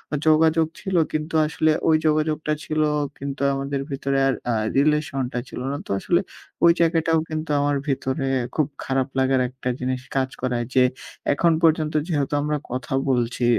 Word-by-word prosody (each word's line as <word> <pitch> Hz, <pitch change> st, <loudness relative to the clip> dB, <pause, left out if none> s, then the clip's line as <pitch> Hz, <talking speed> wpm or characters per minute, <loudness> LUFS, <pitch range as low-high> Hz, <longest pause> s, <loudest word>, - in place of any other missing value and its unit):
আ -, -, 0 dB
যোগাযোগ 160 Hz, +1 st, +4 dB
ছিল। -, -, -15 dB, 0.3 s
কিন্তু 155 Hz, +1 st, -2 dB
আসলে 155 Hz, +1 st, +1 dB, 0.2 s
ওই 160 Hz, -, +5 dB
যোগাযোগটা 155 Hz, 0 st, +1 dB
ছিল 155 Hz, 0 st, -1 dB, 0.4 s
কিন্তু 140 Hz, 0 st, -5 dB
আমাদের 135 Hz, 0 st, -2 dB
ভেতরে 135 Hz, 0 st, -1 dB
আর 135 Hz, -, +2 dB, 0.2 s
আ -, -, +1 dB, 0.2 s
রিলেশন 145 Hz, -2 st, +2 dB
টা 125 Hz, -, -1 dB
ছিল -, -, -7 dB
না। 140 Hz, -, -2 dB
তো -, -, -5 dB
আসলে 175 Hz, -, +2 dB, 0.4 s
ওই 170 Hz, -, +8 dB
জায়গাটাও 165 Hz, -1 st, +3 dB
কিন্তু 155 Hz, 0 st, -4 dB
আমার 145 Hz, 0 st, +1 dB
ভেতরে 135 Hz, 0 st, -1 dB, 0.3 s
খুব 155 Hz, -3 st, +2 dB, 0.2 s
খারাপ 135 Hz, -1 st, 0 dB
লাগার 130 Hz, 0 st, +3 dB
একটা 125 Hz, 0 st, -5 dB
জিনিস 130 Hz, 0 st, -2 dB, 0.2 s
কাজ 130 Hz, -1 st, +1 dB
করায় 125 Hz, -2 st, -1 dB
যে, 130 Hz, -, +6 dB, 0.5 s
এখন 170 Hz, +3 st, +3 dB
পর্যন্ত 155 Hz, -1 st, +3 dB
যেহেতু 145 Hz, -5 st, -1 dB
আমরা 150 Hz, +1 st, 0 dB
কথা 125 Hz, 0 st, -4 dB, 0.2 s
বলছি 120 Hz, -1 st, 0 dB
145 Hz, 170 wpm, -23 LUFS, 130-155 Hz, 0.5 s, ওই